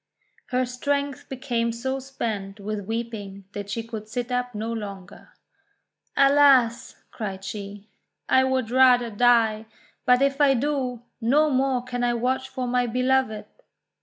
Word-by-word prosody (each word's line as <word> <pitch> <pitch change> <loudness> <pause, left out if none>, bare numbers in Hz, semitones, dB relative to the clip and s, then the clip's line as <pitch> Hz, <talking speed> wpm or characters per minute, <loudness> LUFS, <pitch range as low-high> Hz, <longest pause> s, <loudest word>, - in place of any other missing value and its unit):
Her 255 0 0
strength 280 +2 -2
became 245 -3 -1
so 260 +4 -3
spent 220 -7 -5
with 205 -1 -5
weeping 220 -4 -5
that 205 0 -6
she 225 +3 -3
could 220 -2 -7
sit 245 +2 -4
up 250 -1 -2
no 225 +2 -3
longer. 200 -4 -8 0.8
"Alas!" 275 -4 +4
cried 195 -4 -6
she, 200 0 -7 0.4
"I 260 - +4
would 260 -3 0
rather 250 -2 +5
die; 225 -1 +3 0.4
but 250 +1 +5
if 275 +1 +1
I 275 -2 +5
do, 255 -3 -2 0.2
no 295 +6 +3
more 260 -1 +1
can 245 -1 -4
I 240 0 +1
watch 260 +2 -1
for 255 -1 -4
my 245 0 +1
Beloved! 255 -2 +1
245 Hz, 140 wpm, -24 LUFS, 220-260 Hz, 0.8 s, rather